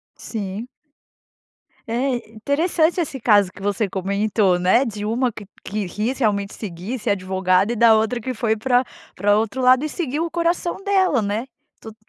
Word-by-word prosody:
Sim. 210 +1 -5 1.2
É 250 +3 0 0.2
interessante 315 - +1
esse 280 -5 -3
caso 205 -5 +4
que 195 - -14
você 205 +1 0
comentou, 200 0 +1
né, 190 +9 +3
de 210 -2 -5
uma 240 +3 0
que 210 -1 -10 0.2
que 205 -1 -3
quis 220 +8 -2
realmente 200 -3 0
seguir, 200 +5 -6
ser 210 - 0
advogada 190 +2 +1
e - - -4
da 225 0 +6
outra 220 +2 0
que 255 +3 -4
foi 220 -1 0
para 250 +2 +2 0.3
para 205 +1 +3
outro 225 +4 -1
lado, 255 +2 +5
e - - -3
seguiu 310 -1 -2
o 335 - -6
coração 345 +2 -1
dela, 375 - +2
né, 210 +5 -2 0.3
tudo, 220 -1 -11
220 Hz, 170 wpm, -21 LUFS, 205-260 Hz, 1.2 s, da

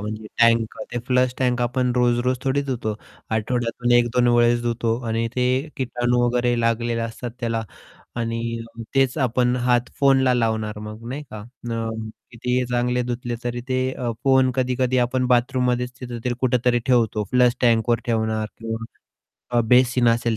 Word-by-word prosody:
म्हणजे 110 +1 -5
टँक 115 -1 +3 0.2
ते 120 - -1
flush 125 -1 +2
tank 125 -2 +1
आपण 125 +1 0
रोज-रोज 125 +1 +2
थोडी 135 +1 +1
धुतो. 120 -6 -3 0.4
आठवड्यातून 120 +2 -1
1-2 120 0 +3
वेळेस 120 0 +4
धुतो 115 -1 0
आणि 115 +1 0
ते 125 - +1 0.3
किटाणू 125 -1 0
वगैरे 120 0 +1
लागलेले 115 0 0
असतात 115 +2 -5
त्याला. 115 -2 -1 0.5
आणि 115 -1 -2 0.4
अ, 115 - -6
तेच 135 +1 +2
आपण 125 +1 +1
हात 120 0 +2
फोनला 135 -2 +4
लावणार 110 -3 -1
मग, 110 +2 -8
नाही 140 +4 -5
का? 110 - -7
अ, 115 0 -5 0.4
कितीही 125 +2 -1
चांगले 125 0 +1
धुतले 120 0 -3
तरी 120 0 -3
ते 130 0 +1
अ, 120 -2 -3
फोन 130 -1 +4
कधी-कधी 130 0 +1
आपण 130 +1 0
बाथरूममध्येच 125 0 +1
तिथतरी, 120 -1 -4
कुठेतरी 125 -1 +2
ठेवतो, 115 -4 +2
फ्लश 125 -1 +4
टँकवर 115 -1 +3
ठेवणार 110 -2 0
किंवा 115 0 -5 0.7
अ, 120 -1 +3
बेसिन 125 0 +4
असेल 115 -1 +1
120 Hz, 150 wpm, -22 LUFS, 115-125 Hz, 0.7 s, वेळेस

